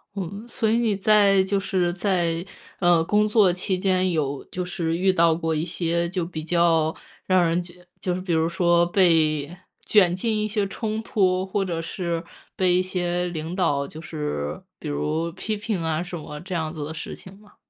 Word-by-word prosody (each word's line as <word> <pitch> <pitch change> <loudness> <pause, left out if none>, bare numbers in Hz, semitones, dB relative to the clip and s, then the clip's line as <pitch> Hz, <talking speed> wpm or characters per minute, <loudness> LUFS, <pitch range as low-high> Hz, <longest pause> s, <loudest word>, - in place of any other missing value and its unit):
嗯， 200 +4 -5
所 225 - -1
以 225 - +3
你 225 -4 +1
在， 200 -1 +4
就 200 +1 0
是 180 -3 0
在， 175 -3 0 0.4
呃， 175 -2 +4
工 210 +5 +2
作 210 -4 +4
期 185 +1 -1
间 185 -1 +1
有 145 -4 -1
就 180 0 -4
是 170 -2 -2
遇 190 +1 +3
到 165 -2 +4
过 165 -1 -1
一 155 0 0
些 170 0 -1
就 180 -2 -2
比 160 -3 -6
较 165 -1 +2 0.3
让 185 -1 +4
人 170 +2 +1
觉 175 +1 -14 0.2
就 180 -1 -1
是 185 - -4
比 180 -3 -2
如 160 +1 +2
说 170 -1 +3
被 165 -4 +2 0.3
卷 185 -5 +4
进 220 +3 -1
一 - - 0
些 210 -1 0
冲 215 +2 -3
突， 185 -4 +1
或 195 +1 -1
者 175 -3 -3
是 170 0 -3 0.3
被 185 -2 +2
一 180 - +4
些 180 -1 -1
领 165 0 -5
导 145 -7 +1
就 155 - -10
是， 150 - -4 0.2
比 - - -7
如 75 - -1
批 215 +3 -3
评 205 -5 -3
啊 160 0 0
什 175 0 -5
么， 150 -1 -8
这 185 +1 -5
样 160 0 -2
子 150 -3 -5
的 150 - -5
事 - - -6
情 190 +1 -12
吗？ 210 0 -21
175 Hz, 215 characters per minute, -24 LUFS, 165-190 Hz, 0.4 s, 在